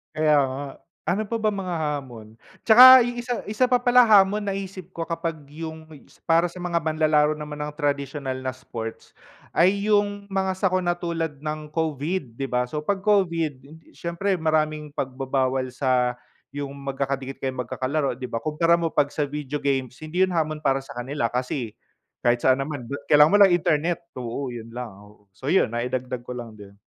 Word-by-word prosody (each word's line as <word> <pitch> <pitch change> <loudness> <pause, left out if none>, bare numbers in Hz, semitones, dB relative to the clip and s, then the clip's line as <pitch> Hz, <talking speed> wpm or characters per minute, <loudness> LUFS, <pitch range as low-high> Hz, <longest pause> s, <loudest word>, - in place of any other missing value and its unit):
Kaya 155 -1 +3
nga, 135 +1 -3 0.4
ano 185 +5 +1
pa 230 +2 -3
ba 215 - 0
mga 185 -3 -3
hamon? 130 -8 -5 0.3
Tsaka 255 +3 +11
isa 245 0 -1
isa 215 +4 0
pa 250 -1 +2
pala 245 0 +6
hamon 210 -2 +5
naisip 195 -2 -5
ko 165 -2 -5
kapag 165 -2 -3
yung 160 +1 -8 0.4
para 165 +1 +3
sa 180 - -11
mga 170 -2 -1
manlalaro 155 -1 +2
naman 150 -1 -7
ng 150 - -4
tradisyonal 140 -2 -2
na 130 - -1
sports, 115 -3 -8 0.4
ay 200 +4 +3
yung 205 -1 +1
mga 190 -1 -1
sakuna 185 -2 +1
tulad 165 -4 -3
ng 150 0 -5
Covid 155 -3 -2
di 135 - -5
ba? 125 -1 0
So 150 +4 -4
pag 200 +4 0
Covid, 170 -9 +1 0.3
siyempre 175 +3 -1
maraming 155 -2 0
pagbabawal 130 -1 -1
sa 125 -1 +1 0.4
yung 140 0 -5
magkakadikit 135 0 -3
kayong 130 -1 -3
magkakalaro 135 +4 -1
di 130 - -4
ba 115 - -4
kumpara 165 +2 +3
mo 170 -1 -1
pag 145 - +2
sa 145 +1 -2
video 145 0 -5
games 135 -3 -1
hindi 155 +3 -4
yun 185 -1 +3
hamon 155 -2 0
para 135 -2 0
sa 135 - -12
kanila 120 -1 -2
kasi, 125 -2 -3 0.5
kahit 120 0 +1
saan 130 +1 +4
naman 140 -1 -4 0.2
kailangan 150 +2 +6
mo 205 - +6
lang 195 -3 +7
internet, 170 +1 0 0.2
oo, 125 +2 -4
yun 115 -2 -8
lang, 125 -2 -5
oo, 105 0 -18
so 115 +8 -10
yun 165 -7 +3
naidagdag 125 +1 -3
ko 125 - -5
lang 120 -2 -7
din. 100 -1 -13
150 Hz, 175 wpm, -24 LUFS, 130-175 Hz, 0.5 s, Tsaka